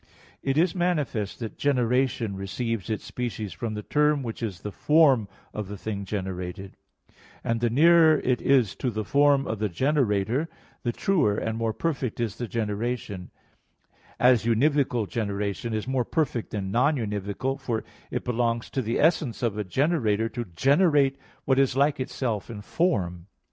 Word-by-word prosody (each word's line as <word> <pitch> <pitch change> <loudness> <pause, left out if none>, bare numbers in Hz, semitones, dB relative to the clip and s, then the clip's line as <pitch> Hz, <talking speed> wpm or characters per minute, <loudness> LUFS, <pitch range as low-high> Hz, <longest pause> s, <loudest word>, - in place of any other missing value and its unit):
It 135 +1 -1
is 165 +1 +3
manifest 150 - -1
that 115 - -6
generation 125 -5 +1
receives 100 +3 -3
its 110 - -3
species 115 -5 -4
from 115 -2 -4
the 105 - -5
term 150 +1 +2
which 115 -2 -6
is 100 -5 -4
the 105 - -5
form 140 -5 +4 0.3
of 105 -2 -4
the 100 +1 -7
thing 100 0 -4
generated; 95 -1 -5 0.7
and 115 0 -1
the 120 - +2
nearer 160 +4 +6
it 125 -1 0
is 130 -8 +3
to 130 - -1
the 110 -2 -3
form 140 +1 +4
of 110 - -3
the 105 -1 0
generator, 125 - +1 0.3
the 120 - -1
truer 150 - +1
and 110 0 -2
more 115 0 0
perfect 135 -4 -2
is 115 -2 -2
the 120 - -4
generation; 110 -3 -3 0.9
as 125 -3 +5
univocal 125 -1 +2
generation 100 +1 -2
is 110 +1 -2
more 130 -1 +1
perfect 125 -3 -1
than 95 -2 -4
non 135 +8 +3
univocal, 105 +3 -3
for 120 -5 -2 0.3
it - - -3
belongs 115 -1 -1
to 135 - -1
the 115 0 -1
essence 150 -7 +2
of 115 -4 0
a 105 - -2
generator 115 - +1
to 120 0 -4
generate 140 - +3 0.3
what 130 0 +3
is 135 -2 +2
like 140 +1 +3
itself 120 -5 -3
in 105 -3 -7
form. 95 - -1
115 Hz, 165 wpm, -26 LUFS, 105-135 Hz, 0.9 s, nearer